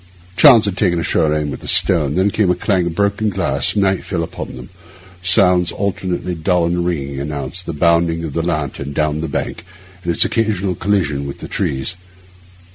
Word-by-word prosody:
Chance 120 -6 +7
had 100 -2 -2
taken 90 -4 +1
a - - -2
sure 75 0 +1
aim 75 -1 -1
with 65 - -6
the - - -11
stone. 75 -6 +3
Then 95 +2 +2
came 105 -3 +1
a 90 - +3
clang 90 -1 0
of 80 - -4
broken 100 +2 +1
glass; 90 -7 +1
night 95 -2 +1
fell 85 -4 -2
upon 80 - -7
them; 65 -1 -10 0.5
sounds 90 -2 +3
alternately 95 -2 -3
dull 85 +1 +1
and 85 +1 0
ringing 70 -6 -3
announced 70 +4 -5
the 85 - -3
bounding 85 +1 +2
of 80 -4 -5
the 85 - 0
lantern 75 -4 -3
down 75 +1 0
the 80 - -3
bank, 70 - -4 0.4
and 85 - -1
its 85 - +3
occasional 100 -3 0
collision 85 -8 -1
with 70 - -7
the - - -8
trees. 65 +3 -2
85 Hz, 195 wpm, -18 LUFS, 75-95 Hz, 0.5 s, Chance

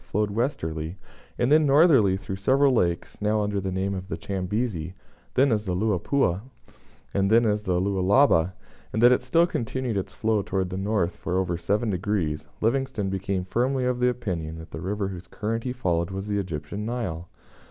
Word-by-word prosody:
flowed 105 0 -1
westerly, 85 - -2 0.4
and 120 - +1
then 155 +1 +6
northerly 135 - +5
through 95 0 -5
several 135 +7 +3
lakes, 85 -6 -1
now 105 +1 +2
under 100 -1 -1
the 95 0 -3
names 95 +1 -1
of 95 0 -7
the 85 -3 -4
Chambezi, 95 -2 -3 0.4
then 135 +1 +4
as 105 -1 0
the 90 -2 -1
Luapula, 100 0 +1 0.7
and 100 0 +2
then 115 +2 +5
as 105 -1 +1
the 90 -4 0
Lualaba, 95 - +3 0.4
and 110 - -2
that 120 - +8
it 125 - +3
still 170 0 +3
continued 125 - -2
its 95 - -4
flow 110 -2 +1
towards 95 -2 -2
the - - -3
north 95 -2 0
for 90 +1 -2
over 90 -2 0
7 100 +7 0
degrees, 90 -5 -1
Livingstone 120 -3 0
became 95 -1 -2
firmly 125 +6 0
of 125 -1 0
the 125 0 +4
opinion 90 -10 -3
that 80 0 -11
the 80 - -6
river 100 +2 -2
whose 90 -2 -8
current 115 +5 -3
he 125 - -1
followed 85 -9 -1
was 95 +1 -5
the 105 -1 -1
Egyptian 90 +2 -4
Nile. 105 -8 -4
100 Hz, 185 wpm, -25 LUFS, 90-120 Hz, 0.7 s, that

